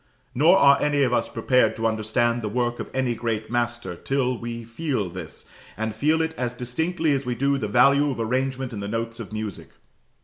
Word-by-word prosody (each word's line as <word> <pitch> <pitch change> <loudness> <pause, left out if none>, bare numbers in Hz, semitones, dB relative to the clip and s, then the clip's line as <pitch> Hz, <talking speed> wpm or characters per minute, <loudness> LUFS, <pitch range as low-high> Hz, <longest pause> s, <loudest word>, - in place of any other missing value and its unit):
Nor 160 +8 +5
are 140 -3 +6
any 145 -1 +2
of 125 -2 +1
us - - +1
prepared 120 0 +2
to 110 +1 -3
understand 115 +2 +1
the 105 - -3
work 120 +2 -1
of - - -5
any 130 -2 0
great 110 -1 -3
master, 120 -6 -2
till 130 +5 -1
we 115 0 -6
feel 115 - -3
this, 85 -3 -8 0.3
and 110 0 -2
feel 155 +8 +2
it 160 0 -3
as 125 -1 -2
distinctly 160 +7 -1
as 140 -1 +1
we 125 -1 -2
do 140 +2 +1
the 110 - -2
value 140 +7 +4
of 130 - -4
arrangement 130 +2 -1
in 105 - -5
the 100 - -4
notes 115 +2 -3
of 115 - -7
music. 110 -2 -5
120 Hz, 205 wpm, -24 LUFS, 110-135 Hz, 0.3 s, are